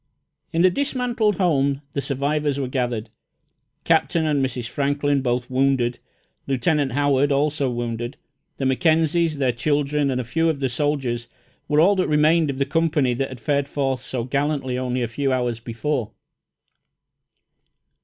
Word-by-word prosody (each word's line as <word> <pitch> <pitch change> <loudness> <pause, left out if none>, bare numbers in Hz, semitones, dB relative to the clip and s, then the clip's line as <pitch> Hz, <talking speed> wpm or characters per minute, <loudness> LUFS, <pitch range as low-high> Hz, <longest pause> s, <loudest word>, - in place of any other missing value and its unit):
In 165 +1 +2
the 185 - +6
dismantled 245 -4 0
home 140 -6 +1
the 140 - -2
survivors 145 +1 -1
were 135 - -1
gathered. 120 -4 -2 0.7
Captain 165 -2 +2
and 145 -3 +1
Mrs. 125 -3 -3
Franklin, 145 +1 0
both 125 -1 -1
wounded; 130 -2 +1 0.5
Lieutenant 140 0 +1
Howard, 145 0 +2
also 140 -1 +1
wounded; 120 +1 -4 0.4
the 135 - -2
Mackenzies, 160 +3 +2
their 130 -3 +2
children, 145 +3 0
and 130 -1 -1
a - - -1
few 165 +8 +1
of 155 -3 -1
the 135 -2 0
soldiers 125 -3 -1 0.4
were 150 0 +2
all 190 +6 +5
that 185 - +1
remained 155 +1 +3
of 135 - -3
the 140 - +1
company 150 -4 +1
that 135 +3 -2
had 130 - -9
fared 140 +3 0
forth 135 -3 -1
so 125 -2 -4
gallantly 140 0 -1
only 125 0 -1
a - - -1
few 135 +4 -1
hours 125 -3 0
before. 120 +1 -2
140 Hz, 155 wpm, -22 LUFS, 125-150 Hz, 0.7 s, the